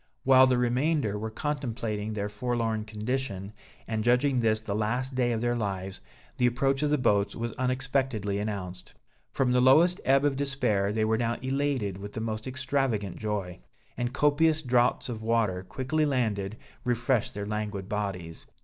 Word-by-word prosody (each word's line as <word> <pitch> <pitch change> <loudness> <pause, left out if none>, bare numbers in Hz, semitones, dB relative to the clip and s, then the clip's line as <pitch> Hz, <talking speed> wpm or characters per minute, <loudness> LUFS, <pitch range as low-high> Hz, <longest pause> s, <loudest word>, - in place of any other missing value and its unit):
While 130 0 +7
the 125 -1 +2
remainder 125 -1 +1
were 110 +1 -3
contemplating 115 -5 -3
their 100 -1 -2
forlorn 115 0 -2
condition, 110 -2 -3 0.3
and 110 -1 -1
judging 125 +3 +3
this 110 -2 +3
the 110 -2 -4
last 120 +5 -1
day 125 -1 +1
of 115 -1 -1
their 120 0 +1
lives, 95 -4 -3 0.4
the 125 - +4
approach 135 +3 +1
of 150 - +1
the 150 - +3
boats 100 -5 +2
was 115 -1 -3
unexpectedly 130 -5 -1
announced. 95 -4 -5 0.4
From 130 -2 +1
the 125 0 +4
lowest 160 +8 +5
ebb 135 +1 +4
of 145 -2 +2
despair, 125 -8 0
they 110 0 +1
were 110 0 +1
now 120 0 0
elated 130 -7 -1
with 100 +1 -8
the - - -4
most 110 +1 -3
extravagant 130 -7 -1
joy; 100 - -3 0.4
and 120 0 -2
copious 150 +3 +2
draughts 125 -1 +2
of 115 -3 -5
water, 110 -5 +1
quickly 130 +10 -1
landed, 110 -6 -1 0.3
refreshed 120 -2 0
their 100 0 -3
languid 105 -2 -3
bodies. 95 -6 -4
115 Hz, 165 wpm, -28 LUFS, 105-130 Hz, 0.4 s, While